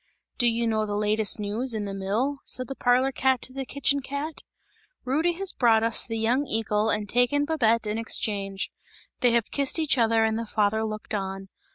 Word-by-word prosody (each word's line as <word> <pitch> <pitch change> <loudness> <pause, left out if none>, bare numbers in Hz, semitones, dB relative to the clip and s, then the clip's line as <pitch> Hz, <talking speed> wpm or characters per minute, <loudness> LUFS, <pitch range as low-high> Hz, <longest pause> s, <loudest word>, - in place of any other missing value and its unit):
"Do 240 - +4
you 235 0 +1
know 215 -1 0
the 205 - -3
latest 210 0 +1
news 220 +4 -1
in 210 -1 -2
the 200 - -5
mill?" 215 +9 -1
said 255 -1 -4
the 270 - -4
parlour 255 +2 +2
cat 265 -1 +1
to 255 - -3
the 270 -1 -5
kitchen 280 0 +1
cat. 285 +3 -5 0.6
"Rudy 310 +7 +1
has 385 +2 -3
brought 225 -3 +3
us 230 -1 +3
the 225 -1 -3
young 235 +5 +1
eagle 220 -1 0
and 210 -1 -1
taken 245 +6 +2
Babette 230 -8 +1
in 210 +1 -2
exchange. 200 -3 -2 0.5
They 250 - +4
have 235 -2 +1
kissed 280 +1 +1
each 305 -5 +1
other 225 -1 +3
and 220 0 0
the 230 - -5
father 215 +1 +1
looked 215 0 -5
on. 195 -1 -4
230 Hz, 200 wpm, -26 LUFS, 215-265 Hz, 0.6 s, Do